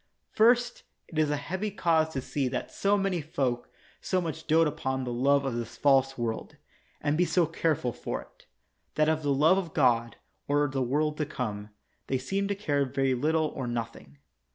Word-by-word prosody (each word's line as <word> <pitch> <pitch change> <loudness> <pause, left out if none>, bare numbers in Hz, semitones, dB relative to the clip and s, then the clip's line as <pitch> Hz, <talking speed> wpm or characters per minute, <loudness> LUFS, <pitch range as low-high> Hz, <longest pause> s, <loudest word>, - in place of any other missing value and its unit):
First, 240 +2 +3 0.3
it 160 - -3
is 155 -1 +3
a 150 - 0
heavy 190 +8 -3
cause 165 -5 +2
to 135 - -2
see 135 +1 -2
that - - -4
so 200 +1 +2
many 195 -4 0
folk 130 -5 -2 0.3
so 185 - 0
much 160 -2 -5
dote 165 0 +4
upon 130 -2 -2
the 125 -1 -3
love 140 +3 +2
of 135 - -1
this 115 -1 -5
false 135 -1 +3
world, 115 -2 -3 0.5
and 145 0 +1
be 175 - +3
so 175 -1 +2
careful 155 -6 -1
for - - -4
it, - - -25 0.5
that 155 0 +3
of 160 0 +1
the 145 -1 0
love 155 +7 +4
of 170 -4 -7
God, 120 -4 +2 0.3
or 145 +1 +2
the 135 -1 -2
world 150 +4 0
to 150 - -1
come, 105 -7 -4 0.4
they 130 - 0
seem 195 +10 -2
to 200 - -1
care 145 -8 0
very 135 0 0
little 155 +4 +1
or 130 - -5
nothing. 115 - -5
145 Hz, 195 wpm, -28 LUFS, 130-165 Hz, 0.5 s, dote